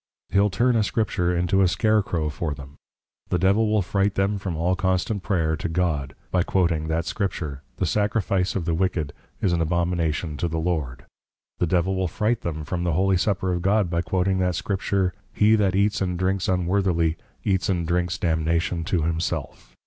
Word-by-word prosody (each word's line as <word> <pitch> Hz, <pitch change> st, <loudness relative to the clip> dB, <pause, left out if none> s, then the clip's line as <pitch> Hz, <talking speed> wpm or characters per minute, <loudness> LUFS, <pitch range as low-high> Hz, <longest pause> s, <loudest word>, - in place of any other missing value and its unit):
He'l 100 Hz, +1 st, +3 dB
turn 120 Hz, +6 st, +2 dB
a 115 Hz, -, +4 dB
Scripture 90 Hz, -5 st, 0 dB
into 90 Hz, +2 st, +2 dB
a 95 Hz, -, +5 dB
Scare 110 Hz, +3 st, +2 dB
crow 80 Hz, -6 st, -2 dB
for 75 Hz, -1 st, -3 dB
them. 70 Hz, 0 st, -11 dB, 0.6 s
The 90 Hz, -, +2 dB
Devil 100 Hz, +5 st, +3 dB
will 105 Hz, -2 st, +2 dB
fright 100 Hz, +2 st, 0 dB
them 100 Hz, +1 st, +1 dB
from 95 Hz, -4 st, -4 dB
all 90 Hz, +3 st, +1 dB
constant 95 Hz, +3 st, 0 dB
Prayer 80 Hz, -5 st, 0 dB
to 90 Hz, -, -4 dB
God, 80 Hz, -6 st, -1 dB, 0.2 s
by 90 Hz, -, +3 dB
quoting 85 Hz, -4 st, +1 dB
that 80 Hz, +1 st, -1 dB
Scripture, 80 Hz, -7 st, -3 dB, 0.2 s
The 95 Hz, -, 0 dB
Sacrifice 100 Hz, -1 st, 0 dB
of 90 Hz, -4 st, -1 dB
the 85 Hz, -, 0 dB
Wicked, 80 Hz, -4 st, -1 dB, 0.3 s
is 90 Hz, -, +3 dB
an 85 Hz, -, +1 dB
Abomination 85 Hz, -2 st, 0 dB
to 85 Hz, -, -1 dB
the 80 Hz, 0 st, -3 dB
Lord; 80 Hz, -7 st, -2 dB, 0.5 s
the 90 Hz, -, +2 dB
Devil 95 Hz, +2 st, +1 dB
will 95 Hz, -1 st, 0 dB
fright 110 Hz, +7 st, 0 dB
them 80 Hz, -2 st, -4 dB
from 85 Hz, +4 st, -2 dB
the 85 Hz, -2 st, +1 dB
Holy 95 Hz, +3 st, +3 dB
Supper 95 Hz, 0 st, 0 dB
of 90 Hz, -, -2 dB
God, 100 Hz, -1 st, +2 dB
by 85 Hz, -1 st, +1 dB
quoting 95 Hz, +1 st, 0 dB
that 90 Hz, -1 st, +1 dB
Scripture, 95 Hz, -2 st, 0 dB, 0.2 s
_He 105 Hz, +1 st, +5 dB
that 95 Hz, -3 st, +2 dB
Eats 100 Hz, +1 st, +2 dB
and 90 Hz, -2 st, -1 dB
Drinks 95 Hz, +1 st, 0 dB
unworthily, 90 Hz, -3 st, +1 dB, 0.3 s
Eats 95 Hz, -2 st, +1 dB
and 90 Hz, -3 st, 0 dB
Drinks 90 Hz, +1 st, 0 dB
damnation 85 Hz, 0 st, 0 dB
to 85 Hz, -2 st, 0 dB
himself. 80 Hz, -2 st, -3 dB
90 Hz, 190 wpm, -24 LUFS, 85-95 Hz, 0.6 s, a